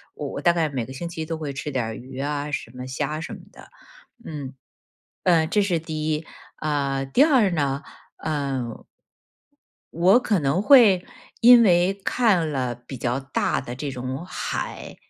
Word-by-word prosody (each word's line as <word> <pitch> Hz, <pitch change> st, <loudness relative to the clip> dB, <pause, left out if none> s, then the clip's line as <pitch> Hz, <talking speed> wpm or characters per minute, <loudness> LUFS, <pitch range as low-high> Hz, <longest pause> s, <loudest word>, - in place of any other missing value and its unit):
我 -, -, -5 dB
我 -, -, -5 dB
大 175 Hz, -, +4 dB
概 165 Hz, -2 st, 0 dB
每 130 Hz, -5 st, -3 dB
个 -, -, -9 dB
星 170 Hz, +6 st, -5 dB
期 165 Hz, -1 st, -5 dB
都 160 Hz, 0 st, -4 dB
会 150 Hz, -3 st, -5 dB
吃 135 Hz, +2 st, -5 dB
点 130 Hz, -5 st, -1 dB
儿 110 Hz, -, -4 dB
鱼 130 Hz, +3 st, -9 dB
啊， 145 Hz, +1 st, -2 dB
什 140 Hz, -5 st, -4 dB
么 125 Hz, +1 st, -8 dB
虾 145 Hz, +3 st, -3 dB
什 -, -, -6 dB
么 -, -, -12 dB
的。 -, -, -15 dB, 0.6 s
嗯， 145 Hz, -, -7 dB, 0.7 s
呃， 170 Hz, -3 st, +4 dB
这 205 Hz, +6 st, +1 dB
是 190 Hz, -4 st, +1 dB
第 155 Hz, -1 st, -4 dB
1。 155 Hz, +1 st, -1 dB, 0.3 s
啊， 140 Hz, -3 st, -1 dB
第 135 Hz, -, +2 dB
2 260 Hz, -, +4 dB
呢， 140 Hz, -3 st, -1 dB, 0.4 s
嗯。 135 Hz, -6 st, -3 dB, 1.1 s
我 185 Hz, +8 st, +5 dB
可 210 Hz, -6 st, +1 dB
能 145 Hz, +5 st, +1 dB
会， 215 Hz, -8 st, +6 dB, 0.4 s
因 240 Hz, 0 st, +9 dB
为 180 Hz, -1 st, +4 dB
看 205 Hz, -10 st, +2 dB
了 130 Hz, -3 st, -2 dB
比 120 Hz, +3 st, -10 dB
较 120 Hz, +2 st, -1 dB
大 135 Hz, 0 st, -1 dB
的 120 Hz, -1 st, -7 dB
这 140 Hz, +3 st, -4 dB
种 130 Hz, +3 st, -5 dB
海， -, -, -5 dB
150 Hz, 180 characters per minute, -24 LUFS, 135-175 Hz, 1.1 s, 因